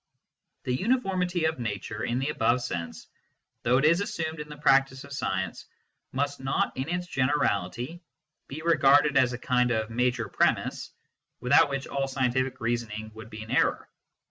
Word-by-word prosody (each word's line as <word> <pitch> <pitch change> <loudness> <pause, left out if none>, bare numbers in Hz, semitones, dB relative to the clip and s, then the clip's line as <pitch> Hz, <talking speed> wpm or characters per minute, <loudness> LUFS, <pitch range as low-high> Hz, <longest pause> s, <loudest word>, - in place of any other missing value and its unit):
The 125 - -1
uniformity 185 - 0
of 160 -2 0
nature, 105 -1 -4
in 120 - -1
the 135 +3 -1
above 125 -4 +1
sense, 85 -8 -5 0.6
although 125 +2 +3
it 135 - +2
is 170 +4 +4
assumed 165 -7 -3
in 150 0 -7
the 150 - -9
practice 135 -2 +3
of 140 0 -10
science, 95 -9 -3 0.4
must 140 +1 -2
not, 135 0 -1
in 130 +4 -3
its 180 0 -2
generality, 130 - -1 0.5
be 155 +4 -7
regarded 145 -3 +5
as 130 -2 +4
a - - -3
kind 125 0 +1
of 110 -1 -1
major 120 -1 0
premiss, - - 0 0.5
with 125 +2 -1
out 145 - +7
which 140 -1 -3
all 135 -1 -2
scientific 130 -1 0
reasoning 115 -2 -3
would 110 0 -11
be 110 0 -8
in 110 - -10
error. - - +1
130 Hz, 170 wpm, -27 LUFS, 120-150 Hz, 0.6 s, out